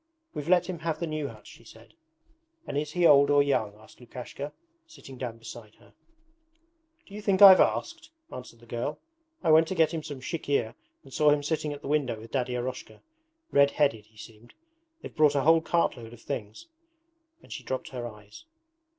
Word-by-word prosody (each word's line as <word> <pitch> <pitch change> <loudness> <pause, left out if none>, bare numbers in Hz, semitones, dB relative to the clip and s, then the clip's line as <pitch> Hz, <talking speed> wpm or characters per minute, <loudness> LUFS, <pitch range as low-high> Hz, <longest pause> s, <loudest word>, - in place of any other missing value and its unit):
'We've 150 +2 -5
let 180 -1 +4
him 180 -3 -5
have 165 -1 -3
the 170 - -2
new 155 -2 -3
hut,' 110 -4 -13
she - - -15
said. 115 +2 -17 0.7
'And - - -6
is 150 +1 -2
he 175 -1 +2
old 140 -2 +6
or 145 0 +5
young,' 110 -7 -1
asked 110 +1 -19
Lukashka, 125 +4 -8 0.4
sitting 225 - -13
down 120 -3 -6
beside 115 -1 -11
her. - - -23 1.1
'Do 200 - -17
you 210 - -7
think 200 -2 +1
I've 195 -2 +10
asked?' 335 -1 0 0.2
answered 125 -2 -10
the - - -16
girl. 120 +5 -4 0.5
'I 165 - +3
went 160 +1 +6
to 190 - -3
get 160 -1 +2
him 160 - -3
some 145 -3 -8
chikhir 140 -5 -2 0.3
and 135 - -16
saw 150 -1 +4
him 145 0 +2
sitting 155 0 -2
at 145 0 -8
the - - -6
window 140 -6 0
with 115 +1 -13
Daddy 125 -2 -1
Eroshka. 125 +1 -6 0.5
Red 140 0 +5
headed 140 -8 0
he 110 0 -26
seemed. 115 +2 -14 0.5
They've - - -9
brought 150 -2 +4
a 140 - +2
whole 165 +3 +5
cartload 125 -9 -1
of 120 - -14
things.' 105 -1 -6 0.8
And - - -10
she - - -7
dropped 130 - -5
her 125 -2 -5
eyes. 105 - -14
140 Hz, 195 wpm, -27 LUFS, 120-155 Hz, 1.1 s, I've